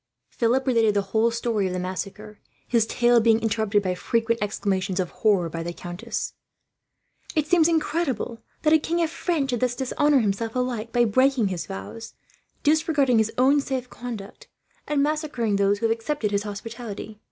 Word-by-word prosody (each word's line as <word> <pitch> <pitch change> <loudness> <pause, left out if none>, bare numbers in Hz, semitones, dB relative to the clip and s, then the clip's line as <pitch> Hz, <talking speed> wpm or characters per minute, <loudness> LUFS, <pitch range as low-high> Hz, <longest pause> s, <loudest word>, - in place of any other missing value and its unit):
Philip 250 +2 +1
related 225 -5 +3
the 200 - +2
whole 225 +1 +4
story 230 -4 -1
of 180 - -3
the 180 - -2
massacre, 195 +3 -6 0.3
his 230 -2 +2
tale 240 0 +4
being 225 0 +4
interrupted 220 -2 +1
by 185 -1 0
frequent 230 +5 0
exclamations 195 -2 -1
of 180 -2 -1
horror, 200 -6 +2
by 165 0 -5
the 170 +1 -4
countess. 185 +7 -5 1.0
"It 310 -2 +2
seems 325 0 +4
incredible," 310 -7 -1
she - - -32
cried, - - -39
"that 305 0 +4
a 315 - +6
king 340 +3 0
of 325 - -1
France 320 -6 -1
should 245 - -1
thus 250 0 0
dishonour 285 +1 +2
himself, 220 +2 -1
alike 240 -3 -2
by 240 0 +3
breaking 255 -1 +3
his 180 -3 -4
vows, 225 +4 -8 0.5
disregarding 295 -5 +3
his 220 0 +1
own 275 +3 +4
safe 260 -2 -4
conduct, 240 - -8 0.4
and 290 -2 +2
massacring 290 -9 0
those 200 0 +2
who 230 - -2
had 225 - +3
accepted 230 -2 -2
his 200 0 +1
hospitality. 215 0 -7
230 Hz, 180 wpm, -24 LUFS, 205-265 Hz, 1.0 s, a